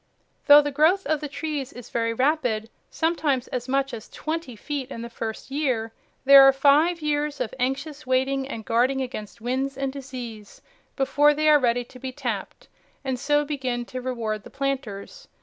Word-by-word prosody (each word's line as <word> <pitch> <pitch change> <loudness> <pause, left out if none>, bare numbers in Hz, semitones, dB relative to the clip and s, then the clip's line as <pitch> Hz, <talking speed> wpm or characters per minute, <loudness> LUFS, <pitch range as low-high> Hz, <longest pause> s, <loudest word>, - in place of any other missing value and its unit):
Though 290 0 +9
the 290 - -2
growth 320 +7 +3
of 310 +1 0
the 300 - -3
trees 290 -2 -4
is 245 -2 -11
very 230 -1 0
rapid, 245 -4 0 0.2
sometimes 305 -6 0
as 250 0 -4
much 275 0 0
as 220 -3 -8
twenty 315 -5 -5
feet 275 +4 -5
in 230 -4 -6
the 235 - -8
first 225 +3 -6
year, 255 -6 -1 0.3
there 275 0 +10
are 270 0 +8
five 295 +5 +3
years 295 -1 -1
of 220 - -3
anxious 280 +3 -3
waiting 265 +1 +1
and 220 -5 -6
guarding 255 +4 +2
against 235 -4 -6
winds 265 +3 -2
and 270 -1 -2
disease 245 -6 -9 0.3
before 290 +2 +3
they 310 +1 +1
are 300 -1 +7
ready 245 -1 +1
to 255 +1 -15
be 260 +1 -5
tapped - - -5 0.4
and 260 -2 -2
so 295 +2 +2
begin 260 -5 -3
to 255 +1 -6
reward 230 -4 -3
the - - -11
planters. 275 - -4
270 Hz, 180 wpm, -25 LUFS, 245-290 Hz, 0.4 s, there